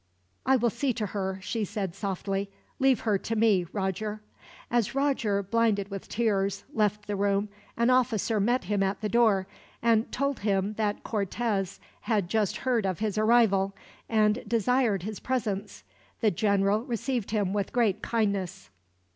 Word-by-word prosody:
"I 265 - +6
will 240 -2 +2
see 250 +3 0
to 220 -2 -2
her," 190 -1 -3
she 225 +2 -2
said, 200 -3 -3
softly. 195 0 -3 0.3
"Leave 265 -2 +3
her 210 -4 +1
to 225 - -3
me, 210 -5 +3
Roger." 210 +2 -2 0.5
As 240 0 +1
Roger, 250 -8 +1
blinded 205 -1 +1
with 195 -1 -6
tears, 200 -3 0
left 210 -1 0
the 205 - -2
room, 200 +1 +1 0.3
an 235 +2 +3
officer 230 -4 +2
met 240 +6 +2
him 205 -1 0
at 195 +2 0
the 210 - -1
door, 220 -5 +3 0.3
and 230 -1 +2
told 280 +1 -1
him 200 0 0
that 210 -1 -2
Cortez 200 -1 -2 0.2
had 205 -6 0
just 215 -2 +1
heard 245 -4 +1
of 185 -3 -1
his 215 -2 -2
arrival, 215 -3 +3 0.3
and 215 +1 +3
desired 230 -3 +2
his 215 +1 -5
presence. 210 -6 -3 0.4
The 215 -3 +3
general 200 +2 +2
received 245 -2 -2
him 205 -3 0
with 200 -2 -1
great 230 -6 +1
kindness. 200 - -1
210 Hz, 155 wpm, -28 LUFS, 195-230 Hz, 0.5 s, I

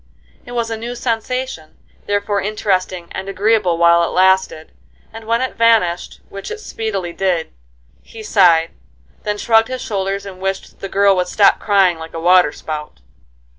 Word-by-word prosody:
It 245 - -8
was 235 -1 -2
a 225 - -3
new 235 +2 -6
sensation, 240 -6 -4 0.3
therefore 205 0 0
interesting 185 -4 -2
and 190 +1 -6
agreeable 195 -3 +1
while 170 0 +5
it - - +1
lasted, 190 -4 +1 0.4
and 225 0 -10
when 230 +2 0
it 260 - -2
vanished, 225 -7 +1
which 195 0 -8
it 440 - -6
speedily 200 - -4
did, 180 -4 -1 0.5
he 225 - -12
sighed, 175 -6 +4 0.5
then 210 0 -3
shrugged 225 +1 +3
his 255 -1 -5
shoulders 195 -1 -3
and 190 -2 -9
wished 195 0 -4
"the 195 - -6
girl 200 0 +3
would 180 0 0
stop 200 +2 +3
crying 195 -5 +2
like 160 0 -9
a - - -3
water 180 -2 +4
spout." 150 - -7
195 Hz, 165 wpm, -18 LUFS, 180-225 Hz, 0.5 s, while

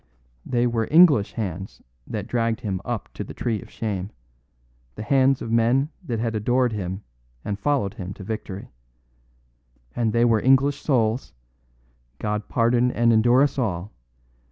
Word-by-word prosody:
They 120 0 +1
were 115 -2 0
English 150 - +5
hands 95 -4 -5 0.2
that - - -4
dragged 115 -1 -1
him 95 -5 -3
up 120 -1 -5
to - - -5
the - - -10
tree 115 -4 -2
of - - -13
shame; 100 -4 -4 0.9
the 105 - -6
hands 135 +2 +3
of 115 - -5
men 120 +5 +2
that 120 -9 -3
had 115 0 -1
adored 120 +3 +1
him 95 -1 -4 0.4
and 100 -1 -3
followed 135 -9 0
him 95 -5 -7
to - - -10
victory. 100 -1 -6 1.2
And 115 -2 +1
they 120 +1 +3
were 115 -3 +3
English 135 +2 +3
souls 120 -3 0 0.8
(God 105 +3 -3
pardon 120 +1 +2
and 115 -1 +3
endure 120 +4 +5
us 140 -1 0
all!) 100 -4 -2
115 Hz, 155 wpm, -24 LUFS, 105-125 Hz, 1.2 s, English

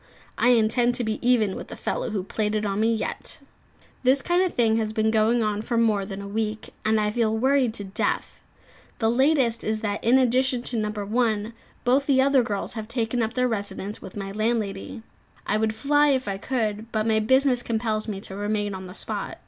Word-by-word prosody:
I - - +2
intend 240 +1 +3
to 245 - -1
be 220 -1 -2
even 235 -6 +2
with - - -7
the - - -8
fellow - - -3
who 205 -4 -2
played 210 +2 -2
it 215 0 -1
on 200 0 -1
me, 225 +1 +3
yet. 230 +7 -4 0.6
This 265 +2 +3
kind 350 +1 +2
of 370 -2 0
thing 225 -2 +3
has 215 -1 -1
been 220 0 +1
going 225 +2 +3
on 210 -1 -1
for 235 +2 -2
more 215 -4 +2
than 200 0 -6
a - - -7
week, 215 +1 -3
and 220 0 +2
I 210 0 +1
feel 220 -1 +1
worried 260 -1 +2
to 205 - -3
death. 195 +1 -2 0.6
The 225 -1 +2
latest 260 -3 +2
is 215 0 -1
that, 205 -2 -2
in 245 +3 +5
addition 255 0 +2
to 245 - -1
No. 215 -2 0
1, 215 +1 -1 0.3
both 265 +3 +2
the 270 -2 +4
other 270 0 +4
girls 205 -4 -3
have 220 -2 -6
taken 235 0 -1
up 225 0 -2
their 250 0 +2
residence 205 -2 -4
with 190 - -10
my 195 -1 -4
landlady. 215 -1 -2 0.4
I 210 - +1
would 220 0 0
fly 290 +3 +3
if 265 -4 +1
I 195 -1 -3
could, 225 -2 -2
but 215 -1 0
my 220 -1 +2
business 260 +3 +3
compels 220 -2 -2
me 205 -3 -4
to 195 - -8
remain 205 0 -1
on 190 -1 -7
the 180 - -10
spot. - - -4
220 Hz, 215 wpm, -25 LUFS, 210-245 Hz, 0.6 s, in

